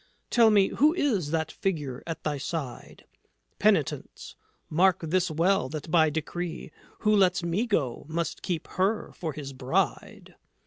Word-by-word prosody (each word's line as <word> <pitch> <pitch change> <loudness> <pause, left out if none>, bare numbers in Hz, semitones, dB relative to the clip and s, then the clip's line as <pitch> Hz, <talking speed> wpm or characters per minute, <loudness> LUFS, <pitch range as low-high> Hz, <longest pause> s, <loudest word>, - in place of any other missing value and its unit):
"Tell 230 -2 +6
me; 200 -3 +4
who 300 +6 +3
is 215 - 0
that 160 0 -1
Figure 150 -9 -3
at 165 - -5
thy 145 -2 -2
side?" 140 -4 -6 0.5
"Penitence. - - 0 0.3
Mark 180 +3 +3
this 175 +3 0
well 165 -2 +1
that 155 +1 -6
by 160 -2 +5
decree 165 +2 -4 0.3
Who 215 0 +3
lets 185 -3 +3
me 175 +8 0
go 140 - -1
must 165 0 -3
keep 170 -3 -3
her 195 +4 -1
for 160 -4 -4
his 140 -2 -7
bride. 130 0 -2
170 Hz, 145 wpm, -27 LUFS, 155-190 Hz, 0.5 s, Tell